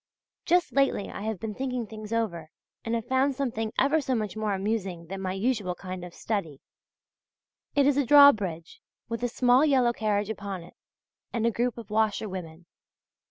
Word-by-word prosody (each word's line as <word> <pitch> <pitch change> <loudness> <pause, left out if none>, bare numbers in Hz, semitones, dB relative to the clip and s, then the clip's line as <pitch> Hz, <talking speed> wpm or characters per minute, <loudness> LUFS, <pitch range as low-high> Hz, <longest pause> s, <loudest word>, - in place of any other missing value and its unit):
Just 350 0 +2
lately 275 -7 +1
I - - -7
have 215 -2 -3
been 220 -1 -4
thinking 250 -1 -3
things 215 0 -9
over, 180 -9 -2 0.3
and 230 +1 -1
have 230 -1 -3
found 260 +2 +1
something 225 -5 -2
ever 290 +4 +3
so 260 -2 -1
much 215 -3 -3
more 215 -2 -1
amusing 190 -4 -2
than 190 +3 -6
my 185 -1 -2
usual 200 -3 -1
kind 185 0 -7
of 175 -1 -9
study; 165 -11 -3 1.2
it 285 -1 +4
is 285 -1 +3
a 285 - +2
drawbridge, 210 - +5 0.3
with 230 0 -3
a 245 - +1
small 250 +2 +4
yellow 260 -5 +3
carriage 210 -2 0
upon 200 -4 -5
it 175 - -15 0.6
and 230 -1 -1
a 235 - +3
group 240 +2 -1
of 225 -3 -10
washerwomen. 190 -6 -2
220 Hz, 175 wpm, -27 LUFS, 195-250 Hz, 1.2 s, drawbridge